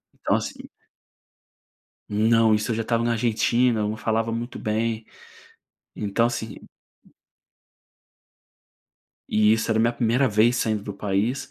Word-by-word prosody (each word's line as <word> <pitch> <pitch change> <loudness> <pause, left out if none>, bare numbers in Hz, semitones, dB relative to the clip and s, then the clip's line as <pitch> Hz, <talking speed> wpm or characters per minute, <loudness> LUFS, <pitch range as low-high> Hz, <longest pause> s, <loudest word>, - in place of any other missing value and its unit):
então, - - 0
assim - - -7 1.4
Não, 110 +1 +3
isso 105 +3 -1
eu - - +1
já 115 - -1
estava 115 +1 0
na 120 0 +1
Argentina, 115 +1 +1
eu 105 - 0
não 110 - -3
falava 115 +1 -1
muito 120 +2 -5
bem, 110 +1 -2 0.9
então, 105 +3 +1
assim 115 -2 -4 2.7
E 105 0 +3
isso 110 +1 0
era 110 - +2
minha 115 +1 +2
primeira 120 +3 +1
vez 110 +3 +3
saindo 110 -3 -1
do 105 - -6
país, 100 +6 -2
115 Hz, 130 wpm, -24 LUFS, 110-115 Hz, 2.7 s, Não